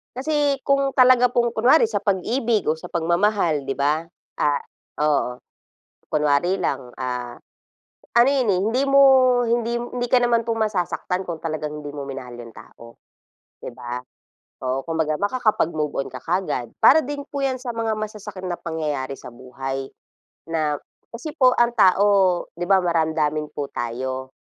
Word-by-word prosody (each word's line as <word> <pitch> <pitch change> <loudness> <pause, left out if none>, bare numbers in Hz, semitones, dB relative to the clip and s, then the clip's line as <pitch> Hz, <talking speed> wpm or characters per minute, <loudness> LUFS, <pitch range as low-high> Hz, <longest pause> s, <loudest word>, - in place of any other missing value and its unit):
Kasi 285 0 0
kung 275 -1 +1
talaga 255 -1 +6
pong 240 -1 +1
kunwari, 245 +8 +4
sa 205 - 0
pag-ibig 215 +3 0
o 160 - -4
sa - - -8
pagmamahal, 170 -3 +1
'di 135 - -2
ba, 150 +4 0 0.3
ah, 145 -1 +1 0.4
oo. 145 -5 +1 0.7
Kunwari 150 +5 +1
lang, 125 -1 -3
ah, 125 -2 -4 0.9
ano 240 - +6
'yon, 250 -6 +2
eh, 185 - +1
hindi 225 +7 +1
mo 275 0 +4 0.5
hindi 235 0 0
hindi 245 0 -4
ka 255 - +6
naman 235 -1 +2
pong 225 0 -2
masasaktan 180 -1 -2
kung 170 -3 -6
talagang 155 -2 -4
hindi 145 -1 -8
mo 140 - -5
minahal 135 -3 -7
'yong 120 -1 -10
tao, 115 +1 -15 0.6
'di 120 - -8
ba. 125 0 -5 0.7
Oo, 130 +1 -1
kung 165 - -2
baga 155 0 -1
makakapag-move 205 - 0
on - - -7
ka 130 - -8
kaagad. 160 -5 -2
Para 310 -1 +6
din 290 0 -4
po 280 -1 -2
'yan 260 -1 -2
sa 255 - -5
mga 225 -1 0
masasakit 210 -2 -6
na 180 -2 -3
pangyayari 150 -5 -3
sa 135 - -10
buhay 135 +2 -6 0.6
na 155 -3 -1 0.3
kasi 270 +6 -7
po 255 -3 +4
ang 240 0 +3
tao 200 -2 +4 0.5
'di 175 +2 -5
ba 195 - +6
maramdamin 160 -3 0
po 145 -1 -4
tayo. 130 +2 -4
175 Hz, 160 wpm, -22 LUFS, 145-235 Hz, 0.9 s, talaga